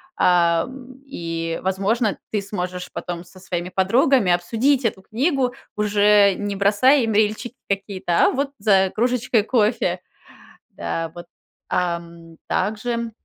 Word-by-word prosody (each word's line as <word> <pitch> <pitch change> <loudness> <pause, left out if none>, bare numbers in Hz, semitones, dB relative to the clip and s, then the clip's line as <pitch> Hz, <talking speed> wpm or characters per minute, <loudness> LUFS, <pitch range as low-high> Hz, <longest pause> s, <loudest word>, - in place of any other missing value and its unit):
а, 170 -2 +3
м, 260 0 -12
и, 165 -8 -4
возможно, 200 +4 0
ты 210 - 0
сможешь 180 -2 -5
потом 175 -1 -5
со 185 +2 -16
своими 180 -1 -4
подругами 215 +2 +3
обсудить 235 +10 +1
эту 205 -4 -1
книгу, 255 - 0 0.2
уже 205 -1 +4
не 205 -1 -3
бросая 210 +8 +4
им 225 -1 -1
рильчики 215 +4 0
какие-то, 195 -3 +1
а - - +4
вот 275 +1 -2
за 195 -2 +3
кружечкой 245 0 +1
кофе. 225 -1 +1 0.7
Да 165 -1 -4
вот, 175 0 -9 0.4
ам, 170 -2 -3
также 230 +2 -2
205 Hz, 125 wpm, -22 LUFS, 180-240 Hz, 0.7 s, уже